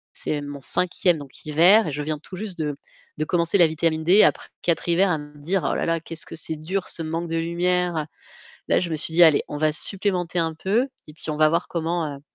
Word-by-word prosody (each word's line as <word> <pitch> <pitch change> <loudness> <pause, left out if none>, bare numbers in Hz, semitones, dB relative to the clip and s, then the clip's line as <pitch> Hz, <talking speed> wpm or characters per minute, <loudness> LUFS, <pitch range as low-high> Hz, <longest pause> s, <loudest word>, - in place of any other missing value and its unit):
C'est 150 -1 -3
mon 145 -1 -7
5e 180 +4 +2
donc 140 -3 -10
hiver 175 +7 +5
et - - -3
je 150 +1 -4
viens 155 0 -2
tout 185 - -11
juste 195 -2 -7
de 150 -2 -2 0.4
de 155 - 0
commencer 170 +3 +3
la 170 - +7
vitamine 160 0 -1
D 190 +6 +6
après - - +1 0.2
4 170 0 0
hivers 185 +3 +3
à 160 - +1
me 150 0 -12
dire: 175 +6 -1
«Oh - - -1
là - - -1
là, 165 0 0
qu'est-ce 165 +1 -5
que - - -9
c'est 160 0 +1
dur 180 +5 -4
ce 165 - 0
manque 165 +1 -4
de 165 - -1
lumière!» 170 -1 0 0.6
Là, - - +3
je 170 -2 -3
me - - 0
suis 155 +1 -4
dit: 175 +1 +7
«Allez, 155 -3 +5
on 145 - -6
va 155 0 +2
supplémenter 180 0 -2
un 165 -1 0
peu 200 +10 0 0.2
et 150 - -12
puis 155 +1 -9
on - - -3
va 155 0 +5
voir 170 +3 0
comment, 165 -3 -2
heu, - - -15
165 Hz, 250 wpm, -23 LUFS, 155-180 Hz, 0.6 s, la